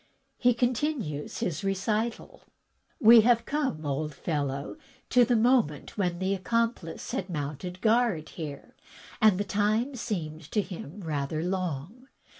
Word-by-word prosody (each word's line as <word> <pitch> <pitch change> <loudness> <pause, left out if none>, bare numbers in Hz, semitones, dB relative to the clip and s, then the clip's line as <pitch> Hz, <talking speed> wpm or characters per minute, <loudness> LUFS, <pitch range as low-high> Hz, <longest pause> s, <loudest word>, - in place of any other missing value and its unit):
he 245 - +5
continues 245 - -1
his 175 +3 -2
recital: 215 - -2 0.6
"We 230 +1 +9
have 230 +1 +3
come, 275 - -2
old 145 +1 -2
fellow, 140 -8 -3 0.3
to 250 0 +6
the 245 0 +2
moment 230 - +2
when 180 -4 0
the 190 +2 0
accomplice 195 -3 -1
had 185 - -2
moimted 165 +3 -5
guard 220 -8 +2
here, 150 -4 -8 0.5
and 215 -4 +6
the 205 - 0
time 215 +6 +1
seemed 165 - -4
to 210 - +3
him 180 0 -8
rather 155 -1 -2
long. 185 - -3
195 Hz, 130 wpm, -28 LUFS, 155-230 Hz, 0.6 s, We